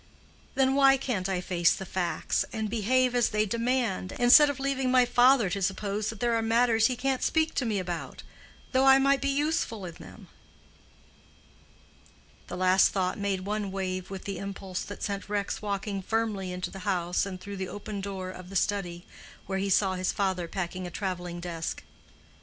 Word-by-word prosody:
Then 265 Hz, 0 st, +3 dB
why 270 Hz, -1 st, +5 dB
can't 210 Hz, -8 st, -2 dB
I 185 Hz, -2 st, -1 dB
face 175 Hz, -2 st, +2 dB
the 190 Hz, -, -7 dB
facts, 180 Hz, -1 st, -1 dB
and 220 Hz, -2 st, -3 dB
behave 250 Hz, +3 st, +2 dB
as 245 Hz, -2 st, +2 dB
they 215 Hz, 0 st, +1 dB
demand, 230 Hz, -3 st, -1 dB
instead 270 Hz, +5 st, +7 dB
of 280 Hz, -2 st, -4 dB
leaving 270 Hz, -1 st, 0 dB
my 255 Hz, -1 st, +5 dB
father 245 Hz, -1 st, +5 dB
to 200 Hz, -, -2 dB
suppose 200 Hz, +2 st, -1 dB
that 220 Hz, -, -7 dB
there 240 Hz, -1 st, +1 dB
are 230 Hz, -, +2 dB
matters 225 Hz, 0 st, +3 dB
he 255 Hz, -, -2 dB
can't 265 Hz, +2 st, -1 dB
speak 320 Hz, 0 st, +1 dB
to 255 Hz, -, -1 dB
me 215 Hz, -2 st, 0 dB
about, 175 Hz, -3 st, -5 dB, 0.5 s
though 260 Hz, 0 st, +3 dB
I 270 Hz, 0 st, +8 dB
might 275 Hz, 0 st, +3 dB
be 280 Hz, -, 0 dB
useful 275 Hz, -, -1 dB
in 170 Hz, -, -7 dB
them?" -, -, -13 dB, 2.2 s
The 180 Hz, -, -6 dB
last 185 Hz, +1 st, +4 dB
thought 185 Hz, 0 st, -1 dB
made 200 Hz, -2 st, -1 dB
one 205 Hz, 0 st, -3 dB
wave 185 Hz, -1 st, -3 dB
with 195 Hz, -1 st, -7 dB
the 200 Hz, -, -4 dB
impulse 195 Hz, -2 st, -5 dB
that 205 Hz, -, -8 dB
sent 200 Hz, 0 st, -3 dB
Rex 205 Hz, -1 st, -2 dB
walking 200 Hz, -1 st, -3 dB
firmly 210 Hz, -3 st, -1 dB
into 180 Hz, 0 st, -4 dB
the 195 Hz, -, -8 dB
house 180 Hz, -1 st, 0 dB
and 185 Hz, -2 st, -6 dB
through 200 Hz, +2 st, -7 dB
the 190 Hz, -1 st, -4 dB
open 205 Hz, 0 st, -6 dB
door 190 Hz, -2 st, -5 dB
of 185 Hz, -1 st, -11 dB
the 195 Hz, -, -9 dB
study, 180 Hz, -3 st, -1 dB, 0.4 s
where 190 Hz, 0 st, -2 dB
he 200 Hz, +1 st, -1 dB
saw 190 Hz, 0 st, +3 dB
his 185 Hz, 0 st, -1 dB
father 190 Hz, -3 st, -1 dB
packing 185 Hz, 0 st, -4 dB
a -, -, -6 dB
traveling 175 Hz, -1 st, -4 dB
desk. 170 Hz, -2 st, -5 dB
200 Hz, 185 wpm, -28 LUFS, 185-240 Hz, 2.2 s, I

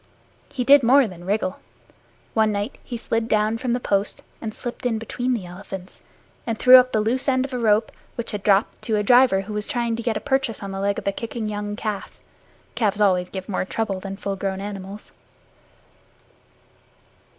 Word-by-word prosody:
He 255 Hz, -, -2 dB
did 280 Hz, +3 st, +7 dB
more 260 Hz, +1 st, +5 dB
than 175 Hz, -3 st, -11 dB
wriggle. 200 Hz, -1 st, -1 dB, 0.7 s
One 220 Hz, -1 st, +3 dB
night 205 Hz, +4 st, -3 dB
he 240 Hz, -, -5 dB
slid 225 Hz, 0 st, -1 dB
down 215 Hz, 0 st, +1 dB
from 245 Hz, -1 st, -1 dB
the 245 Hz, -, 0 dB
post 200 Hz, -3 st, -1 dB, 0.2 s
and 220 Hz, -, -4 dB
slipped 240 Hz, +4 st, -7 dB
in 240 Hz, -3 st, 0 dB
between 245 Hz, +3 st, -2 dB
the 200 Hz, -6 st, -5 dB
elephants 185 Hz, +1 st, -9 dB, 0.5 s
and 225 Hz, -1 st, -1 dB
threw 255 Hz, +2 st, +9 dB
up 255 Hz, 0 st, +4 dB
the 215 Hz, -, +1 dB
loose 245 Hz, +6 st, -1 dB
end 260 Hz, -1 st, +2 dB
of 275 Hz, -, -8 dB
a 250 Hz, -, -2 dB
rope, 220 Hz, -1 st, +2 dB, 0.2 s
which 235 Hz, -, -3 dB
had 210 Hz, -2 st, -4 dB
dropped, 200 Hz, 0 st, +2 dB
to 220 Hz, -, +1 dB
a 210 Hz, -, +1 dB
driver 245 Hz, -3 st, +5 dB
who 205 Hz, +2 st, -7 dB
was 210 Hz, 0 st, -3 dB
trying 240 Hz, -4 st, -1 dB
to -, -, -3 dB
get 230 Hz, -2 st, -1 dB
a -, -, -3 dB
purchase 270 Hz, -6 st, -1 dB
on 195 Hz, -, -5 dB
the 195 Hz, -, -4 dB
leg 200 Hz, +1 st, 0 dB
of -, -, -5 dB
a -, -, +3 dB
kicking 225 Hz, +2 st, -5 dB
young 205 Hz, 0 st, -4 dB
calf 210 Hz, -2 st, -5 dB, 0.5 s
(calves 210 Hz, -3 st, 0 dB
always 180 Hz, -3 st, +3 dB
give 190 Hz, -1 st, -6 dB
more 200 Hz, -, -1 dB
trouble 195 Hz, 0 st, -2 dB
than 195 Hz, +1 st, -6 dB
full 200 Hz, 0 st, -3 dB
grown 190 Hz, 0 st, -3 dB
animals). 200 Hz, 0 st, -7 dB
215 Hz, 200 wpm, -23 LUFS, 200-240 Hz, 0.7 s, threw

